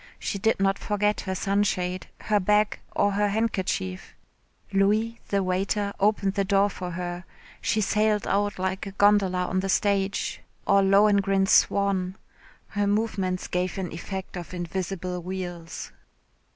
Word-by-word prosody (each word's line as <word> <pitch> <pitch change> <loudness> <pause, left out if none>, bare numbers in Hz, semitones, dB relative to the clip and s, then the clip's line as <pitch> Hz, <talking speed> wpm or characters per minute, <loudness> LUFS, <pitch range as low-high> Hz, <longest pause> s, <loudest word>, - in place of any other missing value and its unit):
She 200 - -3
did 220 +2 +2
not 195 0 +2
forget 210 0 0
her 190 - -1
sunshade, 185 -2 0
her 210 -1 +2
bag, 210 +2 +2 0.2
or 205 - +3
her 205 +1 +1
handkerchief. 190 - -2 0.6
Louis, 215 +4 +2
the 200 -1 +1
waiter, 195 +2 0
opened 200 -1 +2
the 200 -1 +1
door 200 +1 +3
for 180 -1 -5
her. 175 0 -4 0.4
She 215 - +1
sailed 210 +1 +1
out 205 +1 0
like 190 +1 -2
a 195 - -7
gondola 195 -3 +3
on 185 +1 0
the 195 +1 -2
stage, 195 0 0 0.2
or 200 0 +5
Lohengrin's 195 0 +4
swan. 195 -2 +3 0.5
Her 205 -1 0
movements 200 -3 0
gave 180 +1 -2
an 185 -2 -3
effect 190 +4 -6
of 180 0 -7
invisible 180 0 -3
wheels. 175 -2 -6
195 Hz, 140 wpm, -26 LUFS, 185-205 Hz, 0.6 s, or